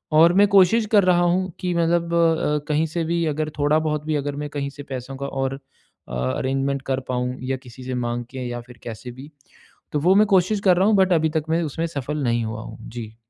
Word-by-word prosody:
और 165 +2 +7
मैं 200 +2 +5
कोशिश 200 +3 +5
कर 205 -3 +6
रहा 180 -1 +4
हूँ 180 +1 +1
कि 180 -1 -1
मतलब 170 0 +1
अ, 160 -3 +2
कहीं 150 +1 +2
से 165 +2 -2
भी 170 +1 0
अगर 155 0 -2
थोड़ा 145 +2 +3
बहुत 150 -1 -2
भी 155 0 -1
अगर 145 0 -2
मैं 150 - -5
कहीं 145 -1 -3
से 145 - -10
पैसों 130 0 -6
का 140 +1 -4
और 135 0 -3 0.5
अ, - - -8
अरेंजमेंट 135 - -1
कर 135 -1 0
पाऊँ 125 0 -1 0.2
या 135 - 0
किसी 125 0 -12
से 130 0 -4
माँग 120 0 -2
के 130 -2 -5
या 120 0 -5
फिर 120 -1 -16
कैसे 120 +1 -7
भी, 135 +5 -12 0.6
तो 150 - 0
वो 180 +5 +4
मैं 210 +1 +5
कोशिश 190 +3 +2
कर 180 -2 +5
रहा 190 +3 +3
हूँ, 215 - +4
बट 190 -1 +4
अभी 160 -1 +2
तक 155 0 -1
मैं 165 +1 +1
उसमें 160 +2 -2
सफल 150 -1 -4
नहीं 120 -2 +1
हुआ 110 0 -5
हूँ। 110 -1 -9
जी। 115 -2 -8
150 Hz, 240 wpm, -22 LUFS, 130-170 Hz, 0.6 s, और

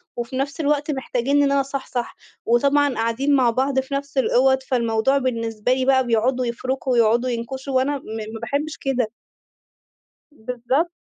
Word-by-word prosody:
وفي 240 +2 -5
نفس 275 +2 -3
الوقت 295 0 +1
محتاجينّي 265 0 0
إن 275 - +1
أنا 280 0 +3
أصحصح 270 -3 -4 0.3
وطبعًا 280 +3 +3
قاعدين 240 +6 +1
مع 255 -3 +4
بعض 265 +3 +1
في 265 +1 -5
نفس 280 0 -4
الأوَض، 265 0 +3
فالموضوع 235 +1 +1
بالنسبة 230 -3 -1
لي 260 0 0
بقى 260 -1 +3
بيقعدوا 245 +3 +1
يفرُكوا 255 +3 -2
ويقعدوا 235 +1 +3
ينكشوا 260 +3 -4
وأنا 275 +3 +2
م - - -12 0.3
ما 225 - -6
باحبش 300 +2 -2
كده. 255 -5 -1 1.2
بالضبط. 250 +5 -2
260 Hz, 150 wpm, -22 LUFS, 240-275 Hz, 1.2 s, مع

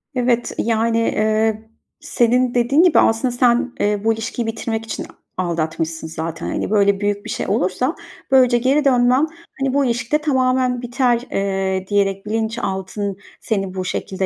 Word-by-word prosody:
Evet, 245 -1 +1
yani, 230 0 +1
eee, 220 0 +1 0.4
senin 245 +1 +1
dediğin 250 +7 +3
gibi 355 - +5
aslında 225 +3 +2
sen, 245 +1 +2
eee, 205 0 +1
bu 225 0 +3
ilişkiyi 225 +1 -4
bitirmek 225 0 -3
için - - -5 0.3
aldatmışsın 165 -2 -2
zaten. 160 +1 -5
Hani, - - -2
böyle, 200 -2 +3
büyük 205 +1 -1
bir - - -7
şey - - -3
olursa, 220 - 0 0.4
böylece 255 -2 +5
geri 270 +5 +2
dönmen, 255 +3 +4 0.3
hani, 270 -1 0
bu 280 -1 +2
ilişkide 240 +4 0
tamamen 255 -4 +1
biter, 245 -1 +1
eee, 190 -1 -1
diyerek 195 -1 0
bilinçaltın 205 -3 -3 0.2
seni 195 -4 -2
bu 185 -1 -3
şekilde 190 0 -3
225 Hz, 145 wpm, -20 LUFS, 200-250 Hz, 0.4 s, gibi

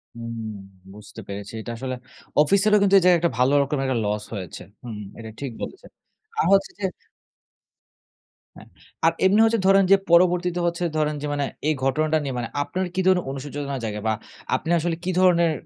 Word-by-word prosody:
হুম, 115 -1 -6 0.5
বুঝতে 105 0 -11
পেরেছি। 100 +1 -7
এটা 120 - -6
আসলে 130 +1 -4 0.5
অফিসেরও 200 +6 +4
কিন্তু 200 0 +4
এই 190 - +4
জায়গায় 180 -1 +6
একটা 170 0 +1
ভালো 130 +3 +3
রকমের 140 0 -1
একটা 130 -2 0
লস 105 0 -1
হয়েছে। 95 -5 -6 0.2
হুম, 110 -4 -7 0.2
এটা 110 -1 -8
ঠিক 140 -3 -4
বলেছেন। 380 - -8 0.5
আর - - +3
হচ্ছে 195 0 +3
যে 195 - -2 1.7
হ্যাঁ। - - -14 0.4
আর 165 - +6
এমনি 195 +3 +4
হচ্ছে 225 -1 +2
ধরেন 195 0 +6
যে - - +10 0.2
পরবর্তীতে 180 0 +4
হচ্ছে 170 +1 -1
ধরেন 150 -1 0
যে 150 - -3
মানে, 145 -1 0 0.2
এই 155 - +3
ঘটনাটা 155 +4 +2
নিয়ে 135 - -3
মানে 120 - -2 0.2
আপনার 185 +4 -3
কি 190 - +1
ধরনের 185 -1 +3
অনুশোচনা 140 +1 -5
জাগে 105 -1 -4
বা 110 - +2 0.4
আপনি - - -4
আসলে 165 0 -1
কি 185 - -1
ধরনের 170 -3 +4
155 Hz, 180 wpm, -23 LUFS, 125-180 Hz, 1.7 s, যে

